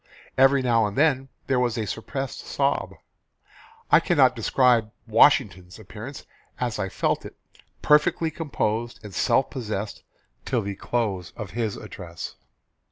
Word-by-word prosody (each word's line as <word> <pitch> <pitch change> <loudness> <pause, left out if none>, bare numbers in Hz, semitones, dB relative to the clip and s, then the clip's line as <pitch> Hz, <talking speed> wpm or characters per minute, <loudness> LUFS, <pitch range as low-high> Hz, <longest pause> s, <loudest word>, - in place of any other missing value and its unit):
Every 135 +1 +5
now 115 -3 +3
and 100 - -7
then 135 -3 +2 0.2
there 130 -2 +1
was 120 -2 0
a 110 - -1
suppressed 125 +7 -4
sob. - - -1 1.0
I - - +8
cannot - - +3
describe 120 -4 +3 0.2
Washington's 105 -6 +3
appearance 110 +6 -9 0.3
as 120 -4 -2
I 95 -2 -1
felt 90 - -1
it - - -10 0.5
perfectly 150 +2 +3
composed 120 -7 -2
and 105 -2 -9
self 130 - +2
possessed 110 -5 -4 0.4
till 120 -4 -1
the 100 0 -3
close 100 -4 -2
of 105 -4 -7
his 110 -2 -2
address. 85 -3 -8
115 Hz, 135 wpm, -25 LUFS, 105-130 Hz, 1.0 s, I